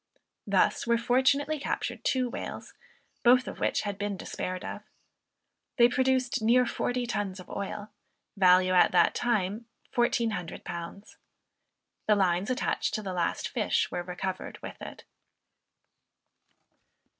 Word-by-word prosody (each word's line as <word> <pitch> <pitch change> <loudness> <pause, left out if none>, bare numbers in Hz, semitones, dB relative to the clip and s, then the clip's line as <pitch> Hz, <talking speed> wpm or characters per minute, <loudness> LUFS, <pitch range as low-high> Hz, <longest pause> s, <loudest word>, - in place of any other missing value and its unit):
Thus - - +2
were 235 0 +4
fortunately 265 +5 +2
captured - - -3
two 255 -1 +1
whales, 240 - -7 0.5
both 250 +2 +5
of - - -7
which - - +1
had 205 -1 -4
been 205 -1 -2
despaired 185 0 -5
of. - - -6 1.0
They 235 -1 +7
produced 260 -1 +1
near 245 +3 +4
forty 245 +1 -1
tons 205 -5 -3
of 185 - -11
oil, 205 +1 -5 0.4
value, 185 -1 +5
at 180 - +5
that - - +5
time 220 -1 -1 0.3
£1400. 200 -5 -2 0.9
The 210 - +5
lines 185 0 +1
attached 255 - -1
to 215 - -3
the 190 -2 -4
last 175 -2 -1
fish 220 -5 0
were - - -2
recovered 185 +1 -5
with - - -8
it. - - -9
215 Hz, 125 wpm, -28 LUFS, 185-245 Hz, 1.0 s, They